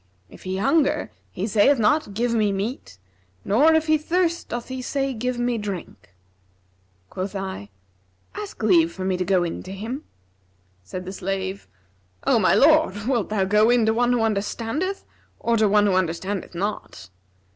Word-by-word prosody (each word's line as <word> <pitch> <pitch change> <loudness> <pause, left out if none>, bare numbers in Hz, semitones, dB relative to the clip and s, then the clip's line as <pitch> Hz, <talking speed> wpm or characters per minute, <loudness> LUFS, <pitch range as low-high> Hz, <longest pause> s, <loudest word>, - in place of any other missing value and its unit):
If - - -15
he 185 0 -2
hunger, 285 +10 +1 0.2
he 185 - -4
saith 220 +6 +4
not, 220 0 +1
'Give 235 +2 0
me 215 -3 +2
meat;' 195 - -4 0.5
nor, 285 +11 +4
if 320 0 +2
he 310 -1 +3
thirst, 340 +2 -1
doth 240 0 -4
he 260 0 -4
say, 270 +1 -2
'Give 250 +2 -3
me 240 -1 0
drink.' 170 - -7 1.0
Quoth 190 +2 -4
I, 190 - -5 0.6
'Ask 210 +1 -7
leave 170 -6 +4
for 185 +2 -6
me 190 -1 +1
to 180 - -1
go 185 -1 +2
in 170 - -4
to 185 - -9
him.' 225 +9 -5 0.8
Said 180 - -7
the 190 - -6
slave, 190 +1 -4 0.6
'O - - +4
my - - +4
lord, 205 +2 +4
wilt 245 -4 0
thou 210 -2 +1
go 210 +3 +4
in 240 -2 +4
to 220 - +3
one 245 +1 +2
who 245 -2 +2
understandeth 225 - -2 0.3
or 235 - +1
to 215 -1 +3
one 210 0 +4
who 200 - +2
understandeth 185 +1 -2
not?' 170 - -5
210 Hz, 170 wpm, -23 LUFS, 190-245 Hz, 1.0 s, saith